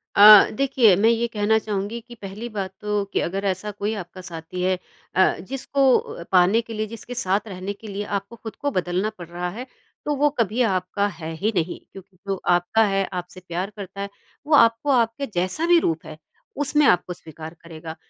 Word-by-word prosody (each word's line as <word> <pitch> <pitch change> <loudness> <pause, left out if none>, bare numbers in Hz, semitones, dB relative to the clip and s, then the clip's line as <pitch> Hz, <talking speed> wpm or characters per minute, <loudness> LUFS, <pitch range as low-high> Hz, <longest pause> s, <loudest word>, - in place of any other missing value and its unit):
अ, 210 0 +10
देखिए 255 -6 +4
मैं 220 +4 +4
ये 235 0 +1
कहना 220 -1 +1
चाहूँगी 210 +2 -3
कि 240 +1 -13
पहली 205 +2 -7
बात 195 -3 -4
तो 210 -1 0
कि - - +2
अगर 195 +3 -3
ऐसा 195 +2 -2
कोई 205 +2 -3
आपका 185 -1 -8
साथी 170 0 -7
है 185 0 +1 0.4
अ, 185 - +4
जिसको 270 +4 +2
अ, 170 - -7
पाने 190 +5 +5
के 225 0 -9
लिए 215 0 -2
जिसके 230 +2 -9
साथ 200 -1 0
रहने 190 0 -5
के 215 +2 -13
लिए 200 +1 -4
आपको 200 +4 -9
ख़ुद 220 -2 -9
को 285 0 -2
बदलना 185 +2 -1
पड़ 175 -2 -9
रहा 175 +1 -4
है 255 - -5 0.4
तो 295 -1 0
वो 295 +2 +3
कभी 225 +3 +1
आपका 195 -1 0
है 165 -5 -7
ही 210 +7 0
नहीं, 175 0 -1
क्योंकि 195 -1 -14
जो 195 - 0
आपका 175 +6 +3
है 195 0 +1
आपसे 180 +1 -6
प्यार 180 +3 -3
करता 200 -1 -7
है 200 - -4 0.4
वो 310 - +1
आपको 230 +3 +4
आपके 235 +1 +1
जैसा 185 - 0
भी 345 -1 +6
रूप 165 - -1
है 155 - -9 0.4
उसमें 295 +1 +2
आपको 180 0 +2
स्वीकार 160 -1 -10
करेगा। 160 -1 -9
200 Hz, 200 wpm, -23 LUFS, 180-230 Hz, 0.4 s, अ